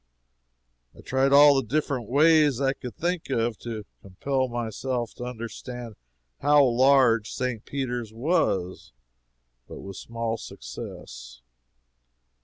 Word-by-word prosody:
I - - -12
tried 135 +1 +1
all 145 +1 +8
the 135 - +2
different 135 -3 -2
ways 150 -1 +4
I 135 -1 +1
could 125 -4 -9
think 175 -2 -2
of 115 -4 -1
to 110 -3 -6 0.2
compel 130 +8 -2
myself 120 0 -3
to 120 - -7
understand 120 0 -7 0.5
how 145 +1 +5
large 125 -3 +4
St. 125 -4 -3
Peter's 125 -5 -4
was, 110 - -1 0.7
but - - -9
with 95 0 -9
small 115 -1 -4
success. - - -10
125 Hz, 115 wpm, -26 LUFS, 115-135 Hz, 0.7 s, all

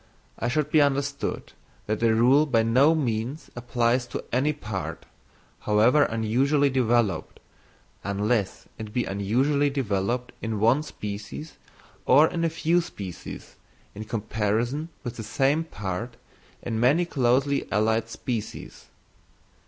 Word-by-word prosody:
It 120 - 0
should 150 +2 0
be 155 - +5
understood 140 0 -1 0.3
that 110 0 -1
the 115 -1 +3
rule 130 +7 +5
by 115 -5 +3
no 130 +8 +4
means 125 +1 -2
applies 120 0 0
to - - -5
any 135 +5 +2
part, 105 -10 -6 0.5
however 115 +8 +4
unusually 135 +6 +1
developed, 115 -9 0 0.6
unless 100 +1 -1
it 110 -1 -7
be 125 -1 +1
unusually 130 +9 +1
developed 120 -2 -1
in 110 -2 -3
one 115 +7 +4
species 105 +3 -7 0.5
or 140 +5 +7
in 170 0 -2
a 165 - +2
few 165 +2 +1
species 95 - -9 0.4
in 110 +2 -7
comparison 115 +7 -1
with 120 -3 -6
the 110 - -5
same 140 +8 +1
part 105 - -5 0.5
in 115 -2 -2
many 145 +9 +3
closely 135 -1 +1
allied 110 +2 +1
species. 115 -1 -6
120 Hz, 125 wpm, -25 LUFS, 110-140 Hz, 0.6 s, or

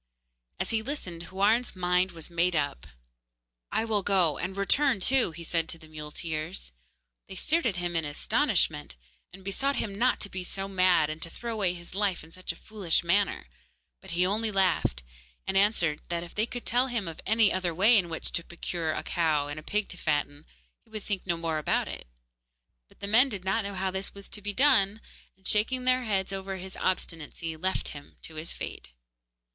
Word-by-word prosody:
As - - -1
he 225 -1 +1
listened 185 - -5
Houarn's 210 +6 +2
mind 180 +1 +2
was 165 0 -6
made 170 +1 +2
up. 145 - -1 0.8
'I 225 - +1
will 215 -2 +1
go, 180 -7 +2
and 185 +3 -3
return 255 +4 +3
too,' 260 +4 +4
he 170 +1 -9
said 165 0 0
to 165 - -3
the 160 -1 -15
muleteers. 155 - -5 0.6
They 190 - -9
stared 320 - +2
at 205 - 0
him 175 -1 -2
in 165 - +1
astonishment, 145 - +1 0.4
and 195 - -12
besought 270 +8 0
him 205 - -2
not 255 +2 +3
to 200 - -1
be 185 -1 -4
so 195 +2 -3
mad 185 -5 +4
and 155 +1 -7
to 165 - -1
throw 235 +6 -5
away 195 -5 0
his 175 0 -11
life 195 -4 0
in 160 - -15
such 185 +2 -4
a - - -10
foolish 200 -7 0
manner; 190 - +2 0.6
but - - -13
he 175 +2 +2
only 215 +3 0
laughed, 180 - +2 0.4
and 190 - -2
answered 195 -6 +3
that 170 -1 -1
if 170 - -10
they 215 +2 +1
could 245 0 -6
tell 250 +2 +3
him 235 -7 -2
of 165 - -7
any 220 -2 +4
other 185 -2 0
way 200 +8 +6
in 185 -5 +3
which 160 - -4
to 170 - +1
procure 170 -2 -3
a - - -3
cow 155 -4 +1
and 145 +1 -4
a - - -9
pig 210 +6 -1
to 180 - -6
fatten, 145 -1 -1 0.4
he 230 - -29
would 215 -2 -6
think 195 -3 -3
no 170 -2 +1
more 165 -2 -1
about 155 - +1
it. - - -7 0.8
But - - -25
the 200 - -3
men 240 +6 +5
did 195 -6 -5
not 195 +4 +1
know 200 0 -4
how 190 0 -1
this 190 +2 -4
was 200 0 -8
to 210 - -6
be 205 +1 -2
done, 220 -5 +5 0.4
and, 190 - -6
shaking 250 +5 +2
their 255 0 +3
heads 195 -2 0
over 195 0 -4
his 190 +1 -8
obstinacy, 165 -2 -2
left 185 +4 -1
him 145 -1 -11
to 160 - -8
his 155 +2 -4
fate. 60 - -6
185 Hz, 205 wpm, -29 LUFS, 165-210 Hz, 0.8 s, way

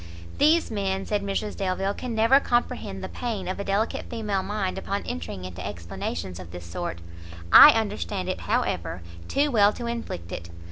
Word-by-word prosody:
"These 320 0 +4
men," 195 -2 -1
said 210 -1 0
Mrs 200 +1 -2
Delvile, 195 +1 -1
"can 240 +1 -5
never 230 +5 +5
comprehend 240 -7 -1
the - - -3
pain 215 -6 -4
of 185 - -3
a - - -2
delicate 200 +3 -1
female 210 -5 -1
mind 200 -2 -2
upon 200 +1 -3
entering 85 +2 -5
into 90 0 -7
explanations 85 -1 -5
of 90 -2 -9
this 90 0 -9
sort: 85 0 -4 0.6
I - - +12
understand 205 -3 -3
it, 185 - -2
however, 90 - -1 0.2
too 290 +1 +1
well 205 -4 +5
to 240 - -6
inflict 230 - -5
it. 85 -1 -6
200 Hz, 175 wpm, -26 LUFS, -, 0.6 s, I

